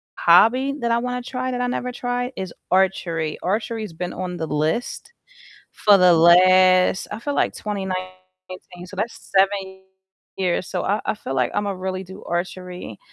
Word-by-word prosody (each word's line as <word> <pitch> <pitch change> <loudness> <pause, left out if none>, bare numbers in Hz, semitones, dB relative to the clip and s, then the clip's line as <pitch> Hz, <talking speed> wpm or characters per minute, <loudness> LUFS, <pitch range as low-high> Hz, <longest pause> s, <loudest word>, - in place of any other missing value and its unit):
hobby 235 +10 +4
that 235 0 -1
I 235 - +2
wanna 250 0 -3
try 255 +1 -4
that 250 - -3
I 245 - 0
never 250 0 -3
tried 245 +1 -3
is 190 -2 -5 0.2
archery. 170 -4 0
Archery's 215 0 -2
been 175 +2 -5
on 180 -1 -5
the 160 - -4
list 155 - -2 0.6
for 205 -1 +4
the 180 -2 +6
last 185 +2 +5
I - - -6
feel 285 +4 -3
like - - +1
2019, 185 -2 -7
so 190 - -12
that's 215 +4 -2 0.2
7 190 -1 +1 0.5
years, 185 -1 -1
so, 180 - -3
I 205 +3 0
I - - 0
feel 135 -10 -6
like 125 -2 +1
I'ma 205 0 -1
really 185 0 -4
do 190 +2 -12
archery 180 +1 -5
190 Hz, 165 wpm, -22 LUFS, 180-215 Hz, 0.6 s, the